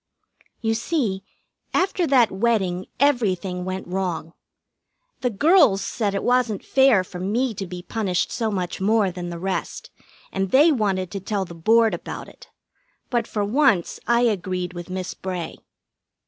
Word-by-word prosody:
You 225 -2 +1
see, 225 - -1 0.5
after 370 -2 +1
that 250 -6 +4
wedding 190 -4 0
everything 190 -10 +1
went 185 0 -4
wrong. 175 -3 -3 0.9
The 250 - 0
girls 240 - +4
said 205 -4 -1
it 195 - -2
wasn't 245 -5 +1
fair 265 -8 +4
for 180 0 -9
me 225 +7 0
to 195 -2 -5
be 180 0 -7
punished 185 -2 -1
so 225 -2 -1
much 185 -2 -3
more 210 -1 +3
than 175 0 -6
the 170 - -5
rest, 190 +2 -4 0.4
and 195 0 -1
they 295 - +6
wanted 195 - 0
to 200 - -4
tell 195 0 -2
the 170 - -10
Board 220 +6 +3
about 175 - -6
it; - - -16 0.6
but 235 -2 0
for 205 -2 -1
once 235 - +2
I 235 0 +4
agreed 185 -5 -1
with 175 0 -8
Miss 185 0 -4
Bray. 180 -3 -5
195 Hz, 155 wpm, -23 LUFS, 185-235 Hz, 0.9 s, they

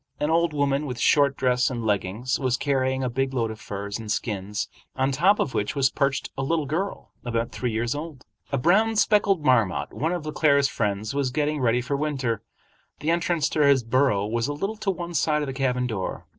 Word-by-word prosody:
An 150 +2 0
old 170 0 +3
woman, 145 0 0
with 125 -2 -5
short 140 -2 +3
dress 125 -1 +2
and 120 -3 -4
leggings, 105 +5 -1
was 130 -3 +1
carrying 130 -1 0
a - - +1
big 135 +2 -1
load 115 -3 0
of 110 - -9
furs 100 +1 -5
and 110 -2 -5
skins, 105 -1 -2 0.3
on 130 +1 +1
top 180 +9 +4
of 135 - -1
which 105 +7 -1
was 135 -2 +2
perched 140 -1 -1
a - - -3
little 155 +2 0
girl 175 +8 -3
about 115 -1 -2
three 125 -2 -2
years 115 +2 -1
old. 145 -2 -7 0.3
A 140 - +1
brown, 210 - +3
speckled 200 -6 +3
marmot, 115 - +2
one 160 +4 -1
of 175 -3 -3
Le 155 - -3
Claire's 140 -2 +3
friends, 105 -2 -2
was 140 -2 0
getting 150 +3 -1
ready 120 0 +2
for 140 +3 -2
winter. 135 -7 -1 0.6
The 155 +3 0
entrance 170 -3 +1
to 150 - +1
his 140 -3 +4
burrow 115 -4 +2
was 115 +3 -1
a 145 - -2
little 195 +9 -3
to 210 -1 -2
one 175 -2 -3
side 150 -1 +1
of - - -4
the 135 - -4
cabin 125 -2 0
door. 110 -6 -4
135 Hz, 215 wpm, -25 LUFS, 120-150 Hz, 0.6 s, top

